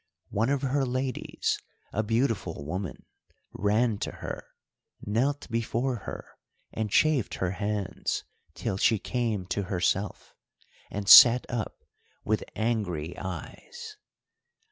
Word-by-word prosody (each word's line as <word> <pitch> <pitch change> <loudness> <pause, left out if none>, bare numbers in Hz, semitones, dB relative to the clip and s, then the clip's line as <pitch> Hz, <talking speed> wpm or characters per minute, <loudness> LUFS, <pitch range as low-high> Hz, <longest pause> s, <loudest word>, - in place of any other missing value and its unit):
One 115 +5 +1
of 140 -1 0
her 135 +1 +1
ladies, 130 0 -2 0.3
a 110 - +1
beautiful 110 - -1
woman, 90 +3 -5 0.5
ran 105 +1 +1
to - - -2
her, - - -6 0.5
knelt 130 +8 -1
before 115 +2 -1
her, - - -6 0.5
and 110 -1 -2
chafed 145 0 +2
her 90 -1 -1
hands, 100 -2 -2 0.3
till 95 - -2
she 110 +2 +3
came 110 -3 -2
to 100 - 0
herself, 95 +2 -1 0.6
and 100 -1 -5
sat 120 +4 +10
up 120 -4 -4 0.4
with 110 0 +1
angry 90 -8 -1
eyes. 430 - -8
110 Hz, 115 wpm, -28 LUFS, 100-125 Hz, 0.6 s, sat